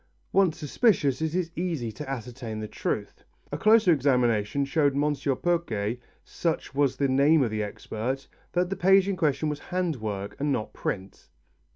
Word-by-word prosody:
Once 190 -5 +3
suspicious, 150 - +2
it 160 +1 -1
is 175 -2 -1
easy 160 -10 -2
to 135 +6 -8
ascertain 120 -3 -5
the 110 - -4
truth. - - -4 0.3
A - - -2
closer 215 -4 +5
examination 125 -3 +2
showed 140 0 +2
M. 145 +1 +1 0.3
Pourquet, 120 -11 0 0.2
such 165 -5 -3
was 135 -2 +1
the 140 - +2
name 140 +3 +4
of 115 - -1
the 110 0 -1
expert, 110 +5 -4 0.3
that 180 +1 +1
the - - 0
page 190 +1 +5
in 200 - 0
question 155 -2 +1
was 150 -1 -2
hand 180 -4 -2
work, 100 -3 -4
and 145 +1 0
not 120 -5 -2
print. 95 0 -5
140 Hz, 170 wpm, -27 LUFS, 120-170 Hz, 0.3 s, closer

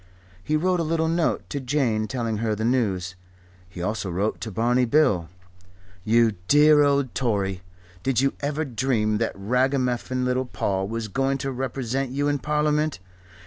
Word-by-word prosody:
He 155 - 0
wrote 180 +3 +1
a - - +1
little 160 0 0
note 165 0 0
to 140 - -2
Jane 125 -5 0
telling 115 -4 -2
her 110 0 -1
the 110 +2 -2
news. 100 -8 0 0.6
He 90 -2 -7
also 105 0 -2
wrote 95 +5 -2
to 110 - -4
Barney 120 +5 +2
Bill: 110 - +2 0.7
"You 115 +2 +4 0.2
dear 150 +1 +6
old 140 -3 +2
Tory 100 -7 -1 0.4
did 130 +2 +1
you 135 +1 +2
ever 145 +2 -2
dream 115 -5 0
that 115 - -1
ragamuffin 125 +3 0
little 125 +1 0
Paul 95 -5 -2
was 115 +1 -4
going 135 +6 0
to 135 0 -3
represent 130 0 -2
you 140 +3 -1
in 145 -1 0
Parliament? 150 +1 0
125 Hz, 160 wpm, -24 LUFS, 110-140 Hz, 0.7 s, dear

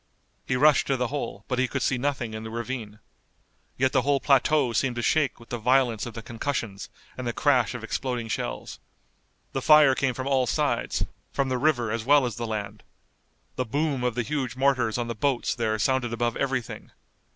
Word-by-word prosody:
He 130 - +1
rushed 150 +3 +4
to 135 - +1
the 125 -1 -1
hole, 125 -7 -5
but 125 -1 -1
he 130 - +2
could 135 0 -2
see 130 - +1
nothing 130 -4 -2
in 110 - -5
the 110 - -6
ravine. 115 -2 -5 0.8
Yet 130 0 +2
the - - +3
whole 140 +1 +2
plateau 140 -2 +3
seemed 125 +1 0
to 120 - -3
shake 150 -2 +1
with 115 - -16
the 120 - -3
violence 125 -1 +2
of 120 - -9
the 115 - -7
concussions 115 -4 -4 0.3
and 130 -1 -5
the 120 - -1
crash 130 -4 +2
of 120 - -6
exploding 120 0 -3
shells. - - -4 0.7
The - - -2
fire 150 -3 +7
came 130 -1 0
from 130 - -4
all 135 -2 +2
sides, - - 0 0.3
from 135 -1 0
the 130 -1 0
river 120 -6 +1
as 115 0 -2
well 140 +2 +5
as 120 -4 -4
the 115 0 -3
land. 105 -2 -5 0.8
The - - +1
boom 140 +1 -1
of 125 -2 0
the 125 - 0
huge 135 -3 -3
mortars 130 -4 +1
on 120 -1 -2
the 115 - -3
boats 130 +2 0
there 110 -2 -1
sounded 125 +1 0
above 120 0 -1
everything. 135 -4 -3
125 Hz, 205 wpm, -26 LUFS, 115-135 Hz, 0.8 s, fire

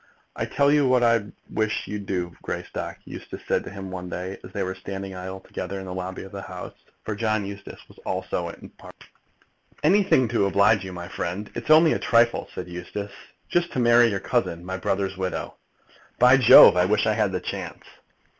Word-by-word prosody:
"I - - -2
tell 140 0 +2
you 145 -2 +4
what 125 -1 +3
I 115 -3 +3 0.3
wish 110 0 -1
you'd 105 -1 -6
do, 90 -2 -3
Greystock," - - -5
Eustace - - -9
said - - +1
to - - -6
him 95 -1 -8
one 90 -1 -6
day, 90 +2 -5
as - - -11
they 100 - -2
were 95 0 -3
standing 95 0 -7
idly 95 +1 -7
together 95 +2 -5
in 95 - -8
the 90 - -6
lobby 95 0 -5
of 95 - -11
the 100 - -7
House. - - -8 0.3
For 110 - -2
John 110 -1 -1
Eustace 100 0 -10
was - - -18
also 95 -2 -3
in - - -11
Parliament. - - -14 0.8
"Anything 180 - +4
to 100 - +2
oblige 100 +1 +3
you, 95 - -7
my 85 -1 -7
friend." 95 +5 -5
"It's 120 +4 -7
only 155 0 +7
a - - -1
trifle," 120 0 +2
said 90 - -5
Eustace. 90 +3 -6 0.4
"Just 175 0 0
to - - -1
marry 120 0 +5
your 100 -3 -1
cousin, 85 -1 -1
my 95 0 -4
brother's 95 0 -2
widow." 95 -1 -3 0.6
"By 125 +2 +6
Jove, 125 -7 +9
I 90 - +4
wish 105 +2 +2
I 110 - +2
had 105 -3 +1
the 90 - -2
chance!" - - -6
100 Hz, 200 wpm, -24 LUFS, 95-115 Hz, 0.8 s, Jove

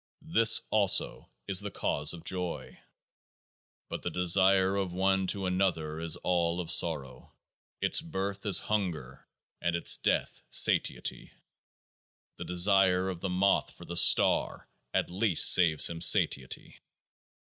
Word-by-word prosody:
This 115 -6 +5
also 100 -3 +1 0.2
is 95 -2 +2
the 105 0 -4
cause 75 -5 -2
of 85 - -9
joy. 90 -2 -5 1.1
But - - -8
the - - -5
desire 95 +2 +2
of 95 -2 -4
one 95 +1 -1
to 95 +1 -4
another 90 -5 -3
is 80 -1 -1
all 85 -1 -2
of 85 -2 -4
sorrow; 75 -7 -1 0.5
its - - +2
birth 100 -11 -6
is 100 - +4
hunger, 85 -11 -5 0.3
and 85 0 -2
its 85 - +3
death - - -3
satiety. - - 0 1.0
The - - -8
desire 95 0 +1
of 90 -3 -7
the 95 - -5
moth 95 +2 -1
for - - -13
the 85 - -8
star 85 0 +2 0.2
at - - -3
least 95 -2 +4
saves 80 -4 +3
him 85 -1 -8
satiety. 65 -5 0
90 Hz, 135 wpm, -27 LUFS, 85-95 Hz, 1.1 s, This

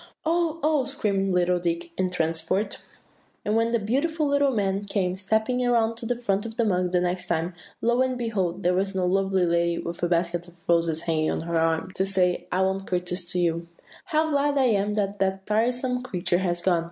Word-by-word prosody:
"Oh, 330 0 +1
oh!" 300 -4 +2
screamed 200 -8 -1
little 180 0 +2
Dick 170 0 -2
in 185 - +1
a - - -5
transport. 165 +3 -1 0.7
"And 210 - +1
when 230 0 +2
the 235 - +2
beautiful 285 +9 0
little 285 0 +3
man 200 -4 0
came 190 -3 -1
stepping 220 +6 0
around 230 -2 +2
to 230 - -4
the 245 - 0
front 205 -4 0
of 225 0 -7
the 235 - +2
mug 180 -3 +1
the 180 - +3
next 180 0 -1
time, 170 +1 -1 0.3
lo, 240 +2 +3
and 260 -1 +1
behold! 195 -6 -2
there 180 +1 +3
was 195 +1 0
no 185 -1 +1
lovely 190 0 +2
lady, 170 0 +1
with 170 0 -5
a 175 - +2
basket 175 0 0
of 175 - -16
roses 165 -1 +2
hanging 155 -1 +1
on - - -1
her 170 +1 -3
arm, 165 +2 +1
to 190 - 0
say, 185 -2 +1
'I 185 - +1
won't 190 0 -1
courtesy 180 0 -2
to 180 - 0
you.' 170 0 -1 0.4
"'How 315 -2 +1
glad 285 0 +2
I 260 -2 +4
am 205 -1 +1
that 200 -1 -1
that 190 0 0
tiresome 250 +3 0
creature 180 -7 0
has 175 -2 -1
gone! 180 -3 +3
195 Hz, 215 wpm, -25 LUFS, 175-235 Hz, 0.7 s, I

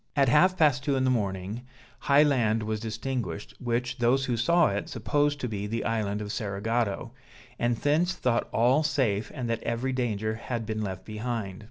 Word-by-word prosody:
At 140 -3 +4
half 185 +8 +4
past 145 -6 +3
two 140 -1 +1
in 130 - +1
the 130 - +3
morning, 100 -1 -2 0.4
high 145 +1 +5
land 115 -7 +2
was 110 0 -2
distinguished, 110 -4 -4
which, 120 +1 -2
those 125 +3 +3
who 125 - 0
saw 170 +10 +3
it 100 +1 -3
supposed 145 +6 0
to 125 - -1
be 105 -2 -4
the 115 +2 -2
island 105 -2 -1
of 105 - -5
Cerigotto, 110 +2 -2 0.5
and 120 0 +1
thence 160 +7 +2
thought 120 -6 0
all 125 +6 +3
safe, 130 -9 0
and 125 -4 -3
that 115 -1 -1
every 125 +3 -2
danger 110 -4 -1
had 115 +1 -4
been 110 0 -3
left 95 -3 -5
behind. 110 -3 -4
115 Hz, 185 wpm, -27 LUFS, 110-130 Hz, 0.5 s, high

